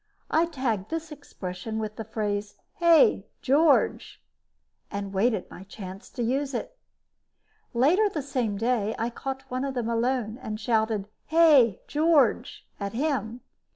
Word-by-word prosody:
I 330 +2 +3
tagged 235 - -2
this 325 0 -4
expression 220 -7 -6
with 215 -1 -4
the 225 - -5
phrase, 210 -1 -3 0.2
"Hey, 340 +6 +5 0.2
George!" 290 +2 +2 0.7
and 200 -1 -5
waited 205 0 +1
my 185 - -10
chance 195 -1 -9
to 245 - -2
use 270 +3 -1
it. - - -4 1.0
Later 345 - +4
the 310 -7 -4
same 245 -7 -2
day, 225 -1 0
I 230 +1 -2
caught 270 +2 -5
one 255 +1 -1
of 275 -1 -3
them 235 -2 -1
alone 235 0 -1
and 215 0 -5
shouted 220 -2 0 0.2
"Hey, 300 - +5
George!" 300 -5 +2
at 200 -1 -4
him. 250 -3 -2
240 Hz, 140 wpm, -26 LUFS, 215-285 Hz, 1.0 s, Hey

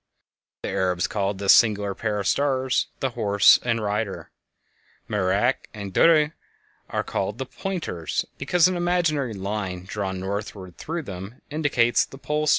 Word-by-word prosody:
The - - -2
Arabs 90 -2 0
called 100 -1 -1
this 100 0 +5
singular 105 -3 +3
pair 105 0 -2
of 100 - -3
stars 130 +2 +1
"The 135 - 0
Horse 100 -3 +5
and 115 -2 0
Rider." 105 0 -3 0.8
Merak 95 -3 0
and 100 -2 -6
Duhbe 155 - +5 0.6
are - - -1
called 100 +3 -3
"The 130 - -3
Pointers," 155 - -3
because 165 +5 +4
an 185 - -1
imaginary 170 -8 0
line 95 -2 -4
drawn 95 -2 -3
northward 95 -2 -5
through 165 +1 -4
them 95 +1 -9
indicates 140 -6 +2
the 135 - -10
Pole 150 +2 -2
Star. - - +4
110 Hz, 150 wpm, -24 LUFS, 100-145 Hz, 0.8 s, this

